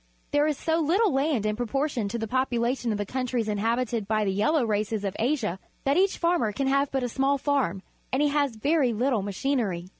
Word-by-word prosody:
There 290 +1 +3
is 300 -3 0
so 325 0 0
little 355 +5 +2
land 270 -5 +1
in 210 0 0
proportion 245 0 -1
to 225 +4 -3
the 225 -1 -3
population 245 0 0
of 210 - -1
the 205 - -2
countries 250 -1 -2
inhabited 225 +1 -1
by 215 0 +1
the 195 - +1
yellow 235 +8 +2
races 210 0 -1
of 195 -1 -3
Asia 225 - 0 0.2
that 275 +1 +2
each 380 +2 +2
farmer 335 -10 +1
can 275 +6 -2
have 275 +1 +2
but 270 -2 -1
a - - 0
small 270 +3 +1
farm, 265 - 0 0.3
and 260 - +1
he 295 0 +3
has 285 -4 0
very 275 +1 +2
little 240 0 +1
machinery. 200 -4 -2
250 Hz, 210 wpm, -26 LUFS, 215-280 Hz, 0.3 s, There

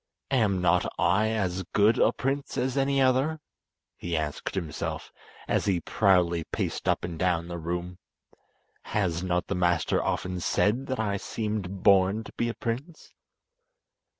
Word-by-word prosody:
"Am 105 -8 +2
not 90 0 +2
I 95 +6 +3
as 95 -4 -1
good 105 +2 +4
a - - +5
prince 135 +1 -3
as 130 0 0
any 135 0 +2
other?" 135 +4 +2 0.6
he 85 -1 -3
asked 75 +3 -3
himself, 85 -6 -4 0.4
as - - +1
he 95 -3 +2
proudly 85 -1 +2
paced - - -3
up - - +1
and 85 -2 -5
down 85 -2 +1
the 85 0 -5
room. 90 +2 -4 1.0
"Has 90 -5 0
not 90 -1 0
the - - -3
master 90 -3 +1
often 90 0 -2
said 115 +9 +1
that 130 -2 -2
I 100 -2 0
seemed 100 -3 -4
born 100 +2 +4
to - - -12
be 120 - -1
a 115 - -4
prince?" 130 +9 -5
95 Hz, 150 wpm, -27 LUFS, 90-115 Hz, 1.0 s, a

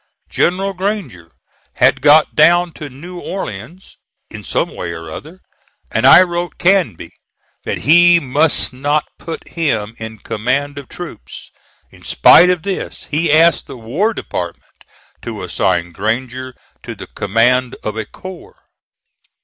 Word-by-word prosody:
General 195 +3 0
Granger 180 - -4 0.4
had - - +2
got 150 +1 +5
down 170 +3 +4
to 150 -2 -9
New 175 +7 -10
Orleans, 170 - -7 0.3
in - - -8
some - - -2
way 85 -1 -5
or 80 -1 -9
other, 160 - -10 0.5
and - - +2
I - - +9
wrote 175 -1 -4
Canby 175 - +1 0.5
that - - -2
he 175 +3 +5
must 145 0 +1
not 145 +4 0
put 165 - -7
him 115 -10 -2
in 110 0 -7
command 140 +8 -2
of 140 - -13
troops. 170 - -10 0.4
In - - -18
spite 180 - +6
of 180 -2 0
this 195 -1 -5
he 155 +1 +1
asked 160 +1 +4
the - - -9
War 140 - -1
Department 85 -1 -5 0.6
to - - -6
assign 85 -2 -1
Granger 125 +6 -3 0.3
to - - -8
the - - -9
command 120 +5 +1
of 105 - -4
a 110 - -3
corps. 190 - -11
145 Hz, 140 wpm, -16 LUFS, 115-175 Hz, 0.6 s, I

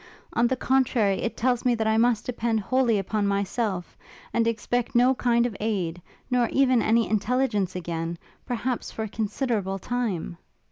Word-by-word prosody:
on 235 - +3
the 260 - 0
contrary, 250 -7 +2
it 235 - -3
tells 245 0 +1
me 245 -1 +3
that 220 -1 -1
I 220 0 +2
must 230 -1 +2
depend 235 -2 -1
wholly 240 +1 +2
upon 200 +1 -1
myself, 200 -2 -1 0.4
and 230 -1 +2
expect 235 +2 -1
no 250 +2 +5
kind 240 -2 +2
of 235 -4 -3
aid, 185 -6 -2 0.3
nor 245 -2 +2
even 260 -3 +3
any 230 +1 +3
intelligence 215 -3 0
again, 170 -1 -3 0.3
perhaps 250 0 -2
for 220 - -5
a - - -3
considerable 210 -2 -2
time!' 200 -6 -3
225 Hz, 160 wpm, -26 LUFS, 200-245 Hz, 0.4 s, no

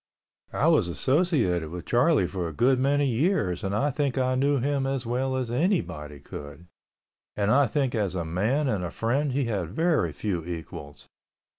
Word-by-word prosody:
I - - +1
was - - +4
associated 120 - +1
with 85 +1 -7
Charlie 125 - +3
for 90 -1 -3
a 80 - -6
good 125 - +3
many 140 +2 +2
years 120 - 0
and 100 +1 -1
I 145 +6 +1
think 140 -1 -1
I 130 0 +1
knew 140 +2 +2
him 135 +1 0
as 135 -2 -2
well 130 +3 -1
as 125 -3 -2
anybody 90 - -1
could, 75 +4 -10 0.7
and 105 0 +1
I 140 +1 +4
think 135 -4 0
as 100 -5 -1
a 85 -2 -2
man 110 - 0
and 105 -7 -1
a 90 - -3
friend 135 - -1
he 135 +1 0
had 100 -8 -2
very 155 - +1
few 85 +3 -3
equals. 80 -4 -8
120 Hz, 180 wpm, -26 LUFS, 90-140 Hz, 0.7 s, was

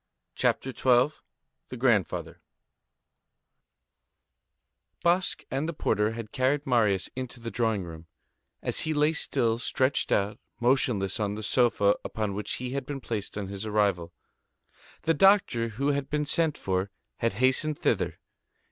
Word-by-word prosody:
CHAPTER 130 - 0
XII—THE 125 +1 -1
GRANDFATHER 115 - 0 2.6
Basque 175 +2 +1
and 140 +5 -1
the - - -3
porter 110 -6 0
had 115 -2 -7
carried 140 +2 +1
Marius 110 -7 +2
into 130 -1 -6
the 115 0 -6
drawing 110 -3 0
room, 80 -1 -10 0.6
as - - 0
he 155 0 +2
still 120 -6 +1
lay 115 - -1
stretched 130 +2 0
out, 100 +1 +1 0.2
motionless, 120 -5 +1
on 105 -1 -1
the 110 - -6
sofa 105 -3 +3
upon 105 -3 -3
which 105 +2 -3
he 125 0 -4
had 135 -1 -3
been 145 -2 -4
placed 110 -5 -4
on 100 -2 -4
his 100 0 -5
arrival. 100 -5 +1 0.9
The 165 - +3
doctor 185 - +4
who 125 +6 -1
had 140 -1 -1
been 150 0 0
sent 160 0 +1
for 95 +1 -1 0.3
had 115 -3 0
hastened 130 +6 +1
thither. - - 0
120 Hz, 140 wpm, -28 LUFS, 105-140 Hz, 2.6 s, doctor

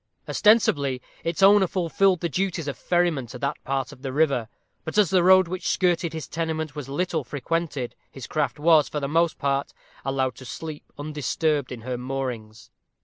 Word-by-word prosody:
Ostensibly 145 - +3 0.2
its 165 +3 -1
owner 200 -1 +7
fulfilled 185 +1 +1
the 170 - 0
duties 175 -1 -2
of 140 - -3
ferryman 175 -7 0
to 125 - -8
that 140 +2 -3
part 135 0 -2
of 140 -3 -14
the 135 -2 -4
river; 135 -6 +1 0.3
but 160 - -5
as 205 -6 +4
the 185 -2 +4
road 185 0 +6
which 185 +2 -4
skirted 175 -2 +1
his 160 -1 -6
tenement 160 -2 -3
was 145 -3 -6
little 165 +1 -1
frequented, 145 0 -3 0.2
his 135 - -9
craft 150 -2 -1
was, 155 -1 +4
for 150 - -2
the 140 - -2
most 165 +3 +1
part, 140 -1 -1 0.3
allowed 135 -1 0
to - - -10
sleep 155 +3 -8
undisturbed 150 0 -1
in 125 -2 -6
her 125 +1 -4
moorings. 125 -4 -5
150 Hz, 180 wpm, -25 LUFS, 135-170 Hz, 0.3 s, owner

